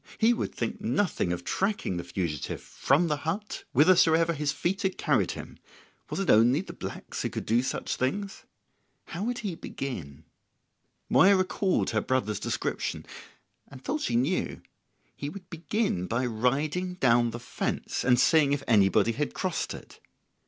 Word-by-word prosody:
He 230 +2 +4
would 235 - -3
think 225 - -3
nothing 205 - 0
of 90 0 -3
tracking 195 - -1
the 85 - -3
fugitive 85 -7 -3
from 145 +6 +1
the 150 -2 0
hut 170 +8 -4
whithersoever 165 +2 +5
his 150 -2 -1
feet 175 +7 -2
had 190 -3 -1
carried - - +1
him; - - -10 0.5
was - - -3
it 195 - +2
only 120 +8 +5
the - - -9
blacks - - -6
who - - -1
could - - -5
do 115 +3 +3
such 130 - -2
things? 195 +11 -2 0.6
How 175 +4 -5
would 245 +2 -1
he 195 - -1
begin? 80 - -6 0.8
Moya 195 +1 +6
recalled 185 0 +1
her - - +1
brother's 110 -6 -1
description, - - -3 0.6
and 130 -1 -13
thought 155 - -2
she 120 - -1
knew. 140 +10 0 0.5
He 145 - -5
would 180 +2 -10
begin 170 - -1
by 120 +4 0
riding 145 +10 0
down 120 -7 +3
the 120 +1 -6
fence, 120 - -3
and 125 -1 +4
seeing 150 -2 +4
if 145 - -1
anybody 105 0 +4
had 145 +6 -3
crossed 185 -3 -2
it. - - -13
145 Hz, 160 wpm, -28 LUFS, 120-185 Hz, 0.8 s, Moya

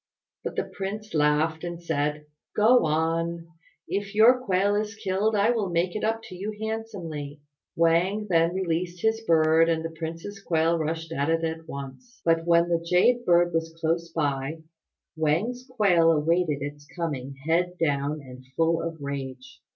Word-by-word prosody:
But - - -4
the - - 0
Prince 210 +2 -6
laughed 155 +2 +2
and 175 -1 -5
said, 150 -2 -2 0.3
"Go 230 0 +5
on. 165 +2 0 0.4
If 200 +1 -3
your 245 +4 +6
quail 195 -1 +2
is 210 +1 -2
killed 210 0 0
I 205 +3 +3
will 220 -5 -1
make 175 +2 0
it 215 - -3
up 225 +1 0
to 185 - -10
you 205 +4 -5
handsomely." 185 -10 -5 0.4
Wang 170 +6 +2
then 165 -1 +2
released 175 -1 -2
his 220 0 +2
bird 165 -3 +4
and 165 -1 0
the 165 - -4
prince's 165 +5 -7
quail 165 -2 +1
rushed 160 +1 -3
at 145 -1 -1
it 165 0 +1
at 160 0 -3
once; 140 - -9
but 165 0 +2
when 170 0 +4
the 170 -1 +1
Jade 185 +8 +3
bird 175 0 +4
was 165 0 -2
close 165 +1 0
by, 145 0 -2 0.5
Wang's 190 - 0
quail 190 -9 +4
awaited 160 -1 +1
its 145 0 -7
coming 140 -6 -4
head 175 +2 +1
down 145 -1 0
and 130 -1 -12
full 165 0 +2
of 165 -1 -4
rage. 135 -2 -6
165 Hz, 165 wpm, -26 LUFS, 160-195 Hz, 0.5 s, your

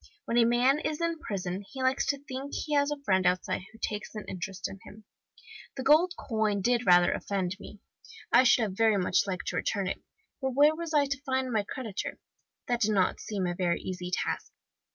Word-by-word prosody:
When 235 - +2
a 230 - +6
man 245 +5 +3
is 305 0 -2
in 335 -1 -1
prison 190 - -4
he 265 -1 -5
likes 260 +1 +1
to 285 - +1
think 275 0 -6
he 305 - -3
has 285 0 +3
a 295 -1 -3
friend 190 -3 +3
outside 180 +1 0
who 225 - -16
takes 210 0 -4
an 210 - -5
interest 185 +1 -4
in 195 - -10
him. 215 +1 -13 0.7
The 260 - -3
gold 330 +6 +5
coin 215 -5 -1
did 245 0 +1
rather 175 -1 +6
offend 190 -2 -2
me; 205 0 -11 0.5
I 240 - +7
should 240 -2 +4
have 205 -3 -2
very 220 -1 +3
much 190 +1 +2
liked 185 -2 -3
to - - -3
return 200 -2 -1
it; - - -3 0.4
but 265 -2 -1
where 295 +2 +6
was 335 0 -5
I 290 -1 +5
to 280 0 -3
find 260 -2 -1
my 220 -2 +2
creditor? 225 -7 -4 0.5
That 240 -1 0
did 215 0 +3
not 190 - +2
seem 200 -4 -3
a 175 - -1
very 175 -1 0
easy 180 -1 -5
task. - - -2
225 Hz, 215 wpm, -29 LUFS, 195-270 Hz, 0.7 s, I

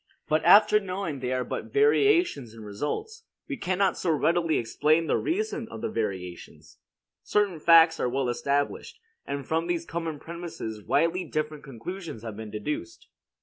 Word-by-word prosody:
But 155 0 +1
after 205 +4 +7
knowing 185 -7 -4
they 125 0 -3
are 130 0 0
but - - -5
variations 370 - +3
in 110 - -10
results, 430 - -5 0.2
we 285 - -3
cannot 190 -4 0
so 180 - -1
readily 165 +2 +2
explain 155 +8 +2
the - - +1
reason 370 - -2
of 110 - -8
the - - -2
variations. 95 -5 -5 0.4
Certain 200 -5 0
facts 165 0 +6
are 125 - +1
well 135 +1 -1
established; 140 +4 -1 0.3
and 140 -1 -4
from 165 +1 0
these 170 -1 -1
common 165 -2 -4
premises 160 -10 -7
widely 165 - +1
different 155 -2 -3
conclusions 150 - -7
have 110 -3 -6
been 110 0 -7
deduced. 305 - -5
160 Hz, 155 wpm, -27 LUFS, 130-190 Hz, 0.4 s, after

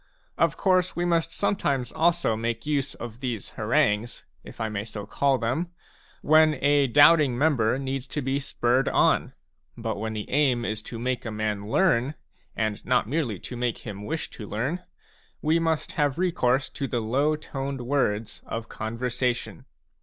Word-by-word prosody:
Of - - +2
course 185 -2 +2
we 175 - 0
must 165 -1 +1
sometimes 140 - 0
also 170 -7 +2
make 115 +1 -3
use 145 -3 -1
of 120 0 -8
these 120 -6 -4
harangues, 105 +3 0 0.2
if - - -12
I 110 - 0
may 105 -2 -3
so 105 -2 -7
call 135 +5 +1
them, 130 +9 -1 0.5
when 155 0 +5
a 140 +1 +3
doubting 145 0 +6
member 130 -5 +2
needs 135 -1 -3
to 150 - -3
be 135 +2 0
spurred 130 -2 +1
on; - - +2 0.4
but - - -3
when 110 +1 -3
the 105 -1 -5
aim 130 -4 +2
is 110 -1 -2
to 120 - -6
make 125 +2 -2
a 115 - -4
man 105 -1 -3
learn, 145 -3 +2 0.4
and 110 -2 -2
not 125 -4 +2
merely 130 -6 -1
to 125 - -7
make 120 -1 -1
him 100 -2 -6
wish 160 +8 -4
to 105 - -9
learn, 130 - -2 0.6
we 160 +2 +2
must 160 -2 0
have 145 -1 0
recourse 140 -7 +1
to 140 - -3
the 120 - -1
low 135 +7 +1
toned 135 -3 -5
words 120 -5 -1
of 115 0 -5
conversation. 120 +2 -2
130 Hz, 170 wpm, -26 LUFS, 115-150 Hz, 0.6 s, doubting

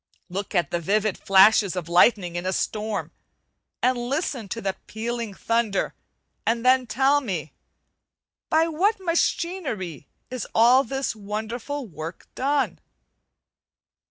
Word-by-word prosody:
Look 195 +3 -5
at 175 -5 +1
the 175 - 0
vivid 205 +4 +1
flashes 195 0 +5
of 175 -3 -4
lightening 175 0 +4
in 175 - -2
a 190 - 0
storm, 215 +1 -2 0.7
and 255 -1 +3
listen 250 - -2
to 230 - -4
the 195 -3 -2
pealing 230 -1 -4
thunder: 230 -2 0 0.5
and 230 +2 0
then 255 0 +4
tell 270 +5 +3
me, 175 - -4 1.0
by 320 +1 +3
what 390 +7 +1
machinery 335 - -1 0.2
is 255 -4 -4
all 245 +4 +6
this 270 0 -3
wonderful 220 +7 -4
work 165 -3 -8
done? 280 +2 0
225 Hz, 125 wpm, -24 LUFS, 195-265 Hz, 1.0 s, all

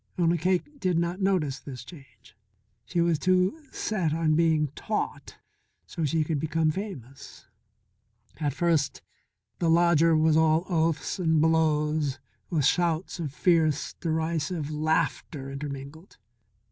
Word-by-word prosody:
Only 170 -1 +2
Cake 185 - -1
did 180 -6 +1
not 170 +3 -1
notice 165 -8 +1
this 130 -4 -9
change. 135 - -16 0.5
She 175 -1 -1
was 170 -3 +2
too 185 - +2
set 175 -8 -1
on 160 -1 +1
being 160 -2 +2
taught 140 - -4 0.5
so 165 - -3
she 155 +2 +1
could 155 -1 -2
become 160 +1 +1
famous. 150 - -8 0.9
At 145 -2 0
first 165 -5 0 0.6
the 170 - +1
lodger 165 -1 +4
was 155 0 +3
all 160 +2 +3
oaths 165 0 0
and 160 -3 +2
blows 155 -3 +2 0.3
with 155 -6 +1
shouts 170 +2 +1
of 155 -5 -3
fierce, 160 -1 +1
derisive 160 -1 -2
laughter 150 -2 -1
intermingled. 140 +4 -8
160 Hz, 125 wpm, -27 LUFS, 150-170 Hz, 0.9 s, lodger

